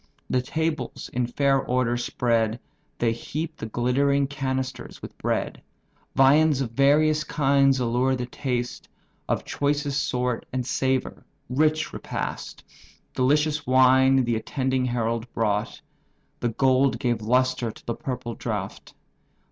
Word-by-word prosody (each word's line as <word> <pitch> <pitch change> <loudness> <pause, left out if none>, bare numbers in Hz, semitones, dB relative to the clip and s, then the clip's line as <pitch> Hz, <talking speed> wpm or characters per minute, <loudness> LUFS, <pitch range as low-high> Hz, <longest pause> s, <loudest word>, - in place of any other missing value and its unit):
The 130 - +2
tables 160 +4 -3
in 125 0 0
fair 135 +2 +2
order 125 -1 0
spread, 115 -2 0 0.4
They 115 -1 +1
heap 155 +7 -5
the 110 - -5
glittering 140 +5 +1
canisters 130 -2 -4
with - - -10
bread: - - -2 0.5
Viands 145 +2 +5
of 130 -4 -2
various 150 +4 +3
kinds 140 -2 +3
allure 125 +2 +1
the 125 -1 -3
taste, 125 -1 -4 0.4
Of - - -1
choicest 145 0 0
sort 125 -1 -2
and 125 -1 -2
savour, 130 0 -1 0.3
rich 155 +4 +1
repast! - - -5 0.5
Delicious 150 +3 +1
wines 130 0 +5
the 120 -1 0
attending 130 +2 -1
herald 115 -1 -2
brought; 105 -2 -1 0.6
The 120 - 0
gold 130 +3 +2
gave 120 -3 -1
lustre 125 +1 +1
to - - -12
the 120 - -2
purple 125 -1 -5
draught. - - -5
130 Hz, 125 wpm, -25 LUFS, 120-140 Hz, 0.6 s, Viands